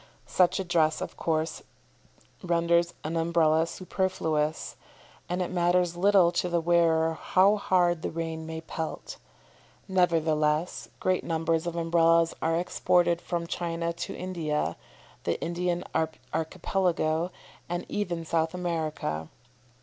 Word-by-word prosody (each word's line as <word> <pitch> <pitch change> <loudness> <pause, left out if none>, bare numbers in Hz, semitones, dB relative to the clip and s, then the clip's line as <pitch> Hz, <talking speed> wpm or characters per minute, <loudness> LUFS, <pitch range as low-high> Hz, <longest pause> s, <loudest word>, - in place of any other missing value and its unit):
Such 180 +1 +2
a - - 0
dress, 165 -3 +2
of - - -5
course, 160 0 -1 0.8
renders 170 -1 +2
an 160 +2 -3
Umbrella 165 -1 +3
superfluous, 160 -4 -2 0.5
and 180 +1 0
it 180 - -5
matters 175 -1 +2
little 185 -1 +5
to 180 +1 -1
the 170 0 +1
wearer 165 -1 +3
how 195 +5 +3
hard 175 -4 +2
the - - -2
rain 160 -1 -4
may 160 0 -5
pelt. 160 0 -6 0.7
Nevertheless 160 -3 +1
great 185 -1 +1
numbers 165 0 0
of 170 - -3
Umbrellas 165 0 +3
are 165 +1 +1
exported 175 0 +2
from 170 -1 -3
China 170 0 -2
to 170 0 -5
India, 165 -5 -2 0.5
the - - -1
Indian 175 +1 -1 0.5
Archipelago, 165 0 0 0.4
and 175 +1 -3
even 175 -5 -3
South 160 +1 0
America. 155 - -3
170 Hz, 120 wpm, -28 LUFS, 160-175 Hz, 0.8 s, little